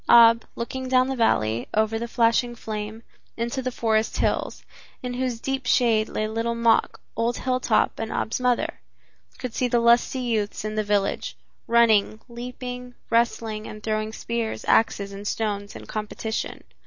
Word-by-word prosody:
Ab, 230 -1 +7
looking 260 +2 -4
down 255 0 +4
the 265 - -1
valley, 115 - +1
over 220 +1 +2
the 235 - -3
flashing 235 +1 +2
flame, 220 0 -5 0.3
into 235 +3 -2
the 255 - -1
forest 220 -2 0
hills, - - -1 0.4
in 250 0 -3
whose 250 -2 -2
deep 270 0 -3
shade 225 -4 +3
lay 215 - -1
Little 230 +2 -1
Mok, 230 -1 +2 0.2
old 230 +1 0
Hilltop 255 -3 +1
and 225 - -3
Ab's 225 - -1
mother, 250 -1 0 0.6
could 250 -3 -5
see 250 - +1
the 240 -1 +2
lusty 235 +2 +4
youths 220 -5 -1
in 215 - -2
the 215 0 0
village, 205 -1 0 0.3
running, 225 -2 +4
leaping, 250 +1 -7 0.2
wrestling 230 -2 +1
and 215 0 -9
throwing 215 0 -1
spears, 230 0 -3
axes 200 -3 +2
and 200 +1 -7
stones 205 -2 -2
in - - -9
competition. 215 +1 -4
230 Hz, 155 wpm, -25 LUFS, 215-245 Hz, 0.6 s, Ab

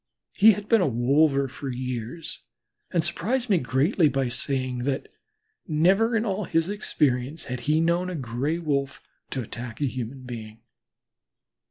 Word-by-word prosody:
He 220 +2 +7
had 210 +1 -6
been 225 -2 +4
a 180 - +3
wolver 140 +3 +3
for 135 +1 -6
years, 125 +4 -5 0.5
and 170 -3 +1
greatly 235 -2 +1
surprised 135 - 0
me 160 -4 +6
by 135 -3 0
saying 130 0 -1
that 135 +2 -2 0.6
"never 195 +9 +3
in 225 +1 +1
all 200 -1 -1
his 165 0 +1
experience 145 -8 0
had 125 -1 -4
he 155 +1 +4
known 170 +2 +1
a 180 - -4
Gray 135 +3 -2
wolf 140 -5 -1 0.3
to 130 - -3
attack 115 +1 -7
a 145 - +1
human 130 0 -4
being." 115 -3 -8
140 Hz, 155 wpm, -26 LUFS, 125-175 Hz, 0.6 s, He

